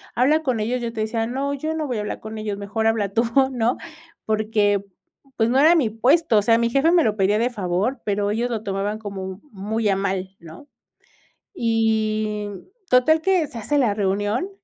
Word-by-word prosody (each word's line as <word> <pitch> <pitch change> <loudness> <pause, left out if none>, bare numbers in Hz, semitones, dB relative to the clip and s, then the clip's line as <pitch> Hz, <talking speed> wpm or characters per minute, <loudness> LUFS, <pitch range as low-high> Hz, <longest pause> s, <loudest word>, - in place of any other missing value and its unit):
habla 300 +6 +3
con 250 -5 0
ellos', 240 +3 -1
yo 235 - -3
te 220 - -3
decía: 225 +1 -1
No, 275 +3 -2
yo 310 +3 -3
no 310 -2 -2
voy 245 - -2
a - - -2
hablar 210 - -5
con 220 0 -8
ellos, 210 -2 -4
mejor 210 +2 -2
habla 215 -3 +1
tú", 230 +2 +2 0.3
¿no? 240 0 0 0.5
Porque, 210 -2 +1 0.5
pues, 225 0 +2
no 260 +2 +3
era 320 +4 +6
mi 270 -10 +2
puesto, 245 +3 +3
o - - +5
sea, 230 +3 +4
mi 235 0 +1
jefe 275 +7 +3
me 345 -3 +4
lo 215 -1 +1
pedía 205 +2 +2
de 240 +2 +1
favor, 205 +4 -2
pero 205 0 0
ellos 235 +3 -1
lo 220 -2 -3
tomaban 200 +1 -2
como 190 -2 -6
muy 210 +2 -2
a 195 - +2
mal, 190 -1 -3
¿no? 170 - -13 0.9
Y 215 - 0 0.4
total 285 +6 +4
que 370 -3 +2
se 260 - -10
hace 290 +7 -1
la 235 -7 +2
reunión 205 - -1
220 Hz, 200 wpm, -22 LUFS, 205-250 Hz, 0.9 s, era